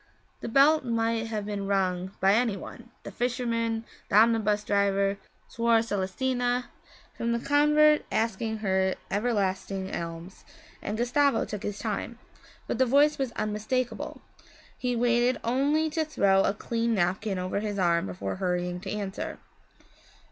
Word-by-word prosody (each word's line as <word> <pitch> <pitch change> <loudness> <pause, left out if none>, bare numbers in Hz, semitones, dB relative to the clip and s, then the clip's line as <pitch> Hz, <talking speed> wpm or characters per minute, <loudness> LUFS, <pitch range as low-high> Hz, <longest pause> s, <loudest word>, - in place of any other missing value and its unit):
The - - -5
bell 285 +6 +5
might 230 -2 -1
have 215 -2 -3
been 200 -1 -4
rung 185 -2 0
by 195 +1 +4
any 225 -2 +2
one 235 +5 -10
the - - -7
fisherman, 230 -2 -1 0.3
the - - 0
omnibus 215 -1 +4
driver, 200 -1 +1 0.3
Suor 230 -1 +2
Celestina 245 +5 -1 0.4
from 235 0 -1
the 235 - 0
convent 300 +3 +4
asking 220 0 -1
her 190 0 +1 0.2
everlasting 195 -3 -1
alms 170 +2 -7 0.4
and 210 - -3
Gustavo 250 +2 +2
took 210 -2 -6
his 205 -1 -4
time. - - -4 0.5
But - - -3
the 260 - +4
voice 290 +4 +4
was 265 -3 -1
unmistakable; 215 +4 -3 0.5
he 250 -1 -2
waited 240 +1 +2
only 280 +6 +1
to 320 +1 0
throw 195 -11 +2
a 200 - 0
clean 230 +1 -1
napkin 190 +2 0
over 185 +2 -2
his 205 -1 -3
arm 170 - +2
before 95 +1 -4
hurrying 180 -1 -1
to 190 +1 -7
answer. 200 -1 -4
220 Hz, 140 wpm, -27 LUFS, 195-245 Hz, 0.5 s, bell